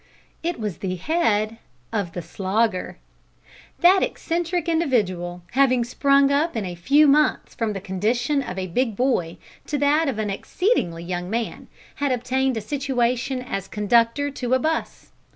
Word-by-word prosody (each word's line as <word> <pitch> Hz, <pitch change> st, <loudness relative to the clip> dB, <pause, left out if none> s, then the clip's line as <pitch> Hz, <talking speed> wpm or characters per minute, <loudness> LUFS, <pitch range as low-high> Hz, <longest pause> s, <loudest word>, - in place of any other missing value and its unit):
It 340 Hz, -3 st, -2 dB
was 210 Hz, -7 st, -3 dB
the 185 Hz, -2 st, -2 dB
head 220 Hz, -, 0 dB, 0.4 s
of 200 Hz, -6 st, -2 dB
the 175 Hz, -, -5 dB
Slogger! 195 Hz, +2 st, -1 dB, 0.8 s
That 370 Hz, +2 st, +6 dB
eccentric 345 Hz, 0 st, -1 dB
individual, 195 Hz, -, 0 dB
having 255 Hz, -2 st, +3 dB
sprung 275 Hz, +3 st, +3 dB
up 290 Hz, -1 st, +1 dB
in 210 Hz, -, -2 dB
a 180 Hz, -, -4 dB
few 275 Hz, -, +4 dB
months 300 Hz, +2 st, +2 dB
from 225 Hz, -2 st, -2 dB
the 195 Hz, -, -4 dB
condition 235 Hz, +9 st, 0 dB
of 185 Hz, -8 st, -6 dB
a 190 Hz, -, -2 dB
big 225 Hz, +5 st, -1 dB
boy 195 Hz, -9 st, 0 dB, 0.3 s
to 295 Hz, -, -1 dB
that 290 Hz, +3 st, +3 dB
of 250 Hz, -, -3 dB
an 210 Hz, -2 st, -1 dB
exceedingly 195 Hz, -, -1 dB
young 180 Hz, 0 st, -4 dB
man, 230 Hz, +1 st, -3 dB, 0.3 s
had 285 Hz, -2 st, 0 dB
obtained 255 Hz, +1 st, 0 dB
a -, -, -2 dB
situation 255 Hz, -1 st, -1 dB
as 195 Hz, -6 st, -4 dB
conductor 230 Hz, +6 st, +2 dB
to 255 Hz, -2 st, 0 dB
a -, -, +2 dB
'bus. 320 Hz, +4 st, -3 dB
245 Hz, 155 wpm, -23 LUFS, 200-285 Hz, 0.8 s, That